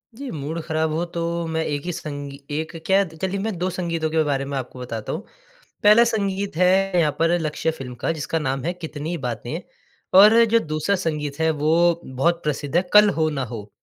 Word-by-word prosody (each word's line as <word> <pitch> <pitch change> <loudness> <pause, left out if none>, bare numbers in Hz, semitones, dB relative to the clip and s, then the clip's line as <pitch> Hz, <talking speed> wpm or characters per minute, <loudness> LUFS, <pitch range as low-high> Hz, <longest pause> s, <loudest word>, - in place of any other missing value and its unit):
जी, 275 +1 -7
mood 155 +2 -4
ख़राब 160 0 -1
हुआ 165 +3 -1
तो 170 - -2 0.3
मैं 160 0 -1
एक 145 0 -3
ही 180 - -2
संगी 145 -2 -6 0.2
एक 160 +2 -5
क्या 195 +1 +4
कह 160 +2 -4
लीजिए 195 +1 -3
मैं 220 -4 -2
2 180 +2 -1
संगीतों 170 -3 -2
के 160 0 +2
बारे 140 -2 -1
में 140 0 -3
आपको 130 0 -6
बताता 115 -3 -5
हूँ। - - -5 0.6
पहला 210 +3 +7
संगीत 200 -4 -1
है 185 +1 +3
यहाँ 150 -3 +2
पर 165 +2 +3
लक्ष्य 155 +1 -1
फ़िल्म 135 -6 -8
का 165 - 0
जिसका 160 +1 -2
नाम 135 -3 -2
है 175 - 0
कितनी 160 -1 -5
बातें। 125 +4 -4 0.6
और 220 +3 +8
जो 230 0 +3
दूसरा 155 +2 -1
संगीत 150 -4 -3
है 160 - +3
वो 165 +3 +2
बहुत 165 +7 0
प्रसिद्ध 145 0 -3
है, 175 - +5
कल 210 0 +8
हो 160 -4 +1
ना 135 -3 -2
हो। 110 -3 -8
160 Hz, 210 wpm, -22 LUFS, 145-180 Hz, 0.6 s, और